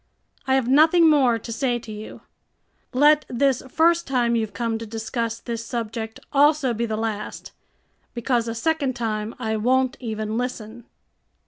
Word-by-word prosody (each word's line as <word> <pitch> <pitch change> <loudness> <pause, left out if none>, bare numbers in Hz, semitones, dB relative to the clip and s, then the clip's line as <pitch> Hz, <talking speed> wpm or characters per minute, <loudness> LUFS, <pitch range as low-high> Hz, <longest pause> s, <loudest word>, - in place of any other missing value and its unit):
I 265 - +3
have 265 -3 +1
nothing 315 +5 +5
more 260 -6 +4
to 230 +1 -8
say 240 +1 0
to 230 -2 -10
you. 210 0 -9 0.7
Let 295 +3 +5
this 265 +1 +1
first 335 +4 +2
time 240 -3 +1
you've 220 -2 -1
come 230 -2 -2
to 230 - -6
discuss 225 +1 -3
this 230 -1 -5
subject 225 -1 -5
also 290 -2 +4
be 235 +1 -2
the 215 -1 -2
last, 220 -2 -4 0.6
because 235 0 0
a 230 - -3
second 280 0 0
time 220 -2 -3
I 220 -3 -2
won't 255 +4 +1
even 220 -1 -3
listen." 240 -2 -5
235 Hz, 155 wpm, -23 LUFS, 225-265 Hz, 0.7 s, nothing